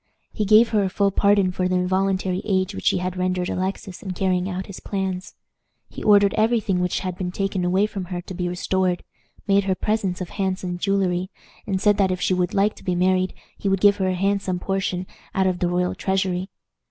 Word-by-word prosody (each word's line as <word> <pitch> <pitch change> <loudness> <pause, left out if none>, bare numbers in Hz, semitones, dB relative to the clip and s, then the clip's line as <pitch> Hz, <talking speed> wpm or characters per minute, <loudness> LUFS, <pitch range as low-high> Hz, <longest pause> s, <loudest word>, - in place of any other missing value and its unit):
He 210 - -1
gave 215 +3 +6
her 215 -2 +2
a 190 - 0
full 200 +1 +1
pardon 200 -1 +3
for 180 0 -1
the 185 - 0
involuntary 185 0 0
aid 190 -1 0
which - - -4
she - - +4
had 180 0 -3
rendered 180 0 -1
Alexis 190 0 -4
in 190 -2 -4
carrying 185 0 0
out 185 0 -4
his 195 - -9
plans. 190 -1 -4 0.5
He - - -9
ordered 205 -1 +5
every 225 +2 +3
thing 190 -3 -1
which 180 0 0
had 185 -2 -3
been 180 -1 -3
taken 195 -1 -2
away 185 +3 +2
from 195 -3 -5
her 180 0 -4
to 185 - -9
be 180 0 -2
restored, 180 0 0 0.4
made 200 0 +3
her 190 -1 +1
presents 200 -3 -1
of 185 - -5
handsome 185 -2 -2
jewelry, 185 -2 0 0.4
and 190 -2 0
said 205 0 +3
that 195 -2 +3
if 185 -1 -1
she 185 - +1
would 180 -1 0
like 205 +2 +3
to - - -14
be 180 -2 0
married 185 +1 +1 0.2
he 200 - -1
would 195 -1 +2
give 200 +1 +5
her 190 - 0
a 185 - 0
handsome 195 -1 0
portion 185 -1 -2 0.3
out 190 - +2
of 185 -1 0
the 175 - +1
royal 180 0 0
treasury. 190 -1 -1
190 Hz, 220 wpm, -23 LUFS, 180-195 Hz, 0.5 s, gave